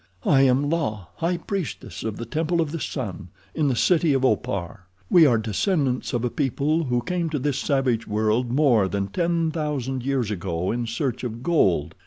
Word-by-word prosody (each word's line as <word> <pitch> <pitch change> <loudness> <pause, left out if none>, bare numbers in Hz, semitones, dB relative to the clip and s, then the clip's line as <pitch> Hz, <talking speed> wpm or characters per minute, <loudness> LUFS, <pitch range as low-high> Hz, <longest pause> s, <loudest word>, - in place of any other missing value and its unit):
"I 135 -2 +5
am 135 +1 +3
La, 140 - -1
high 175 +2 0
priestess 185 -1 -5
of 110 -2 -3
the 115 - -5
Temple 165 +7 -1
of 160 -3 0
the 165 - -4
Sun, 115 - -5 0.3
in 155 -2 +1
the 130 - +1
city 165 +3 +3
of 135 -1 +2
Opar. 95 -5 -2 0.2
We 165 -3 +7
are 120 -4 +4
descendants 125 - 0
of 120 0 -1
a 120 - -1
people 150 +3 0
who 125 -2 0
came 175 -2 -1
to 155 - -2
this 140 0 -1
savage 130 -5 0
world 110 +3 +1
more 125 -7 +3
than 100 0 -2
ten 170 - 0
thousand 140 -5 -2
years 130 -5 0
ago 90 -2 -2
in 120 0 -2
search 115 +2 -2
of 120 0 -5
gold. 95 - +2
130 Hz, 190 wpm, -24 LUFS, 110-155 Hz, 0.3 s, We